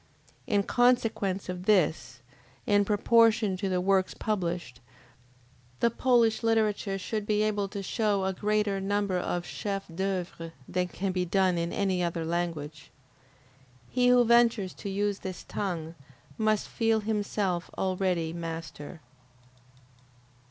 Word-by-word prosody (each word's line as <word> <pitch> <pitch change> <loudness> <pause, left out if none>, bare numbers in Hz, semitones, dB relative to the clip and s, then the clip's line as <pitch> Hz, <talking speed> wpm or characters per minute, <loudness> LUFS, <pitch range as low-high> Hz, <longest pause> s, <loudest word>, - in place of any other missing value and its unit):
In 205 -2 +2
consequence 225 -6 +1
of 180 0 -5
this, 150 - +2 0.4
in 205 0 +3
proportion 215 -1 +3
to 195 +1 -2
the 185 -1 +1
works 190 0 +1
published, 175 - -3 1.0
the 235 - +3
Polish 235 -2 +3
literature 215 -3 +1
should 210 +2 -4
be 210 0 +2
able 205 -2 0
to 200 0 -6
show 205 -1 0
a 190 - 0
greater 210 0 0
number 200 -1 0
of 175 0 -2
chefs 195 -1 -4
d'oeuvre 175 -2 -4
than 180 0 -1
can 190 +2 -3
be 180 0 0
done 185 -1 +2
in 170 0 -2
any 190 -2 0
other 170 -1 -2
language. 160 -4 -3 1.0
He 250 -1 +2
who 245 -1 +6
ventures 235 -5 +3
to 200 - -7
use 200 +1 -1
this 185 -1 -6
tongue, 170 -5 -4 0.4
must 215 -1 +1
feel 225 -1 +1
himself 205 -4 -1
already 185 -3 0
master. 165 -1 -7
195 Hz, 130 wpm, -28 LUFS, 180-215 Hz, 1.0 s, who